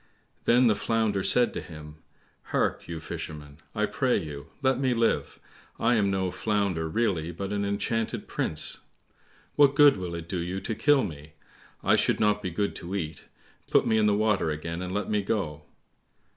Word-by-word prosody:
Then 125 +2 +5
the 115 - +5
Flounder 110 -1 0
said 120 +5 +3
to - - -4
him, 75 -2 -11 0.5
"Hark, - - -1
you 85 -1 -5
Fisherman, 75 -2 -7 0.2
I - - +2
pray - - +1
you, 75 -1 -6 0.2
let 130 -1 +3
me 130 -2 +1
live, 115 0 0 0.4
I 120 - +3
am 105 -4 +2
no 95 -2 0
Flounder 95 -4 -1
really, 90 -5 0
but 100 +2 -5
an 100 0 -1
enchanted 105 +3 -2
prince. 75 - -2 0.8
What 140 -1 +6
good 145 -3 +7
will 90 -2 -4
it 85 -1 -6
do 90 0 -2
you 90 +3 -3
to 110 - -3
kill 140 +4 +3
me? 75 -5 -7 0.5
I - - +4
should - - +2
not 105 0 +2
be 95 - -3
good 100 +4 -2
to 90 +3 -6
eat, 80 -5 -4 0.4
put - - +4
me 110 - +3
in 105 - +3
the 105 - +3
water 105 -5 +2
again, 85 +3 -4
and 90 0 -4
let 105 0 -2
me 105 -1 +1
go." 95 -7 -2
100 Hz, 185 wpm, -27 LUFS, 85-110 Hz, 0.8 s, good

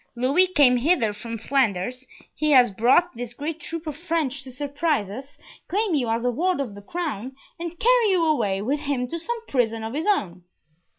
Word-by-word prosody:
Louis 275 +10 +3
came 285 -8 +4
hither 245 -5 +2
from 230 +2 -6
Flanders, 250 0 -1 0.3
he 305 0 -1
has 250 -4 +6
brought 250 - +3
this 240 0 -6
great 300 +4 -4
troop 330 -1 -6
of 305 -3 -4
French 320 -5 -2
to 260 -1 -10
surprise 285 - -1
us, 265 +6 -9 0.3
claim 410 0 0
you 255 -6 +1
as 230 +2 -1
a 245 - +2
ward 355 +6 0
of 255 -7 -3
the 205 - -10
crown, 265 - -4 0.2
and 340 0 -5
carry 480 +1 +4
you 360 -4 +3
away 205 -11 +1
with 280 +6 0
him 280 -4 -2
to 335 - -4
some 465 +6 -4
prison 225 -4 0
of 225 +1 -5
his 315 +7 -2
own." 185 - 0
275 Hz, 195 wpm, -24 LUFS, 235-330 Hz, 0.3 s, has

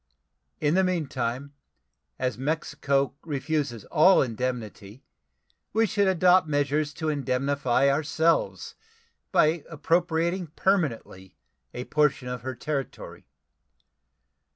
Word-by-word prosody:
In 150 0 +1
the 190 +1 +3
meantime, 140 -6 -2 0.6
as 125 -3 -1
Mexico 140 0 -1
refuses 145 -5 -3
all 175 +4 +5
indemnity, 115 -2 -5 0.7
we 225 +2 +3
should 205 -1 +1
adopt 185 -1 +4
measures 145 0 0
to 160 - -4
indemnify 140 -2 +1
ourselves 150 - +1 0.6
by 155 0 +3
appropriating 170 +3 0
permanently 130 - -1 0.4
a 125 - -4
portion 150 -3 +1
of 125 -2 -5
her 130 +1 -5
territory. 140 +2 -5
145 Hz, 95 wpm, -26 LUFS, 130-165 Hz, 0.7 s, all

